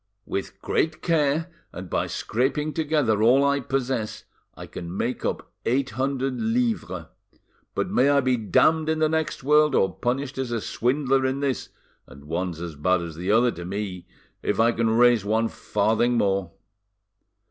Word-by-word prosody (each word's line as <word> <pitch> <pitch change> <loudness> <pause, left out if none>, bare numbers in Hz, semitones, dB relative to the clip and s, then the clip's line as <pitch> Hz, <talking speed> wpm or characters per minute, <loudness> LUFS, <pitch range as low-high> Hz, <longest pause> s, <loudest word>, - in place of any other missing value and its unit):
"With 100 - -4
great 160 0 0
care, 160 0 +1 0.2
and 90 +1 -8
by - - -1
scraping 145 +6 -1
together 145 -9 +1
all 125 +5 +5
I 140 0 +2
possess, 130 -4 -2 0.3
I - - -8
can 85 +2 -7
make 120 +4 -2
up - - -3
eight 130 +1 0
hundred 130 +1 -2
livres. 115 +1 -1 0.7
But - - -1
may 130 +3 +4
I 140 0 +4
be 130 -2 +2
damned 155 +8 +2
in 160 - +1
the 155 0 +3
next 160 -3 -2
world, 150 +1 +4
or 95 - +2
punished 130 +2 -2
as 130 -2 -2
a 115 - 0
swindler 135 +4 0
in 130 +1 0
this, 135 -2 -2 0.4
and 70 +2 -14
one's 85 +1 -3
as 85 -3 -6
bad 90 +4 +1
as 85 -2 -7
the 90 +4 -2
other 120 +3 +4
to 85 - -8
me, 95 -1 -5 0.3
if - - -1
I 115 +1 +5
can 115 -1 0
raise 120 -1 +4
one 110 +2 +1
farthing 110 +3 0
more." 95 -4 0
120 Hz, 170 wpm, -25 LUFS, 105-140 Hz, 0.7 s, all